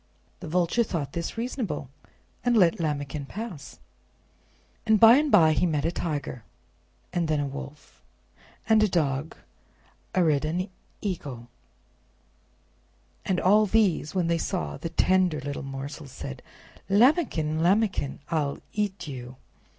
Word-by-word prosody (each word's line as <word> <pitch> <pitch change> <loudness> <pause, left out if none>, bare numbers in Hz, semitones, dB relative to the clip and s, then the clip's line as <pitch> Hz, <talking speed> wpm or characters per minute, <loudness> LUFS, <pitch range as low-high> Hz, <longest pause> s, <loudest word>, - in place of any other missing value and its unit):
The 170 - -8
Vulture 180 +8 +2
thought 150 -10 -4
this 170 +6 -4
reasonable, 225 - -3 0.6
and 240 -1 +3
let 175 -5 +4
Lambikin 145 -2 -3
pass. 200 -8 -7 1.1
And 220 -2 +3
by 230 +3 +9
and 295 0 +1
by 160 -6 +6
he 180 - +2
met 150 -2 -1
a 165 - +1
Tiger, 145 -8 -4 0.7
and 175 -2 0
then 155 -1 +1
a 145 - 0
Wolf, 140 +1 -9 0.7
and 220 -1 +5
a 215 - +5
Dog, 150 -3 -1 0.8
arid 155 -6 +3
an 175 +5 -2 0.3
Eagle, 140 - -5 1.8
and 185 -2 +1
all 210 +3 +4
these, 195 -7 +1
when 180 -2 +1
they 170 0 +1
saw 75 - -2
the 165 - -5
tender 180 -1 +2
little 140 0 -5
morsel, 135 +2 -7
said: 70 - -8 0.5
"Lambikin! 200 - +3
Lambikin! 190 -6 +1
I'll 150 -4 0 0.2
EAT 200 -4 -2
YOU!" 125 -2 -7
165 Hz, 130 wpm, -26 LUFS, 145-200 Hz, 1.8 s, by